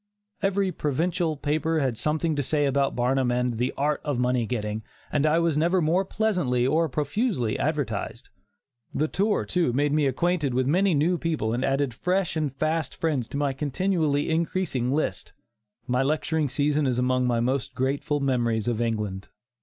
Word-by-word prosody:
Every 195 -1 +1
provincial 160 +2 -1
paper 155 +3 0
had 130 -5 0
something 155 +5 0
to 145 - 0
say 145 +2 +1
about 140 0 +1
Barnum 125 +1 +1
and 125 -2 0
"The 125 - +1
art 145 +2 0
of 145 -4 -1
Money 125 -2 +1
Getting," 105 -2 -3 0.3
and 150 +1 +2
I 155 +2 +3
was 165 -3 +2
never 175 +4 +2
more 170 +4 +2
pleasantly 180 - 0
or 160 +4 +2
profusely 145 - -1
advertised. 130 -5 -2 0.7
The 155 - +1
tour, 205 +5 0
too, 175 -8 +1
made 145 +2 +1
me 150 -2 +3
acquainted 150 -1 0
with 130 0 +2
many 180 +5 +3
new 165 +4 +2
people 155 -10 -1
and 120 - -1
added 135 -2 0
fresh 180 +8 0
and 155 -3 0
fast 155 +4 -1
friends 145 -8 -1
to 140 - -5
my 140 -1 0
continually 150 +1 0
increasing 160 -6 0
list. 105 -9 -2 0.5
My 125 +1 +1
lecturing 155 +1 0
season 145 +2 +1
is 125 -2 0
among 125 0 +1
my 120 -1 +1
most 130 +2 -1
grateful 140 +3 0
memories 120 -5 0
of 120 -1 0
England. 105 -4 -2
145 Hz, 170 wpm, -26 LUFS, 125-160 Hz, 0.7 s, I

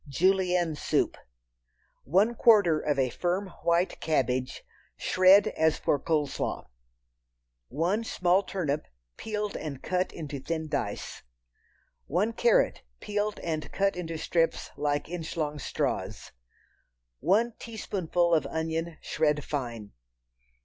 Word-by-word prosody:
Julienne 180 +2 +2
Soup. 150 - 0 0.9
One 195 - +3
quarter 205 -9 +5
of 145 -2 -1
a 130 -2 +1
firm 185 +6 -1
white 170 +2 +1
cabbage, 130 -4 0 0.3
shred 185 +2 +5
as 160 0 +1
for 145 - +1
cold 150 -1 0
slaw. - - -3 1.0
One 175 - 0
small 180 -3 +2
turnip, 155 -7 -2 0.3
peeled 210 -1 -3
and 140 -4 -6
cut 185 0 0
into 145 -4 -6
thin 160 +3 -3
dice. 100 -7 -3 0.9
One 200 +9 +1
carrot, 235 0 +3 0.2
peeled 210 0 -2
and 155 -2 -3
cut 195 -1 +1
into 165 -2 -4
strips 165 +1 0
like 145 0 -1
inch 165 -1 -5
long 150 -2 -2
straws. - - -3 0.9
One 225 +6 +2
teaspoonful 180 -6 -1
of 160 - +2
onion 160 0 -3
shred 150 -2 0
fine. 120 -7 -4
165 Hz, 115 wpm, -28 LUFS, 150-190 Hz, 1.0 s, quarter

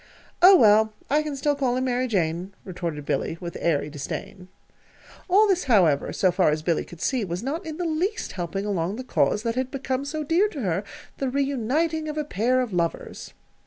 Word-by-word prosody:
"Oh, 375 +2 +9
well, 220 - +5 0.2
I 300 +1 +4
can 305 -2 -4
still 290 +2 +1
call 255 -3 0
him 255 - 0
'Mary 255 0 0
Jane,'" 180 -2 -1
retorted 170 -5 -5
Billy, 165 - -1
with 170 -2 -7
airy 150 -4 +1
disdain. 180 +6 -7 0.8
All 410 +4 +5
this, 370 -5 +1
however, 180 - +3
so 185 - +2
far 175 - +3
as 155 +1 -1
Billy 165 -1 +1
could 170 -2 -13
see, 255 -4 0
was 180 +1 -4
not 320 +7 -3
in 315 -1 -5
the 355 - -2
least 360 +8 -1
helping 185 +3 -4
along 190 -2 -1
the 255 - -6
cause 220 -4 +1
that 230 -1 0
had 255 +1 -2
become 265 0 -3
so 305 +2 -4
dear 335 +8 +3
to 305 -10 -7
her 190 -2 -1 0.4
the 270 - 0
reuniting 280 +4 0
of 300 - -5
a 300 - -1
pair 255 +1 +1
of 240 -6 -4
lovers. 170 -2 -3
245 Hz, 200 wpm, -25 LUFS, 180-295 Hz, 0.8 s, Oh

